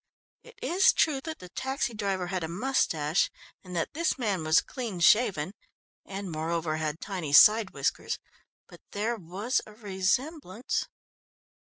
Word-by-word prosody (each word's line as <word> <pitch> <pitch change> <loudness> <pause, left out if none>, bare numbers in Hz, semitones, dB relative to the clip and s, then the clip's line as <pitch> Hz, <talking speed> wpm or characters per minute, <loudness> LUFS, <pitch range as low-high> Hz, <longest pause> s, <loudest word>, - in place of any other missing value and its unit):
It 480 - -16
is 375 +3 +4
true 290 -4 +2
that 320 -1 -5
the 180 - -12
taxi 265 +2 -2
driver 195 -4 -2
had 180 -1 -3
a - - -2
moustache 170 - +1 0.3
and 180 -1 -9
that 165 - -2
this 335 -1 0
man 205 -9 -1
was 155 +1 +5
clean 230 -9 -5
shaven, 185 -3 +4 0.5
and 195 -2 -6
moreover, 160 0 -2
had 155 0 -3
tiny 180 -8 -4
side 210 +6 +8
whiskers, - - -2 0.5
but - - -15
there 220 +4 -1
was 200 +6 -2
a 215 - -13
resemblance. 215 - -2
195 Hz, 145 wpm, -28 LUFS, 170-240 Hz, 0.5 s, side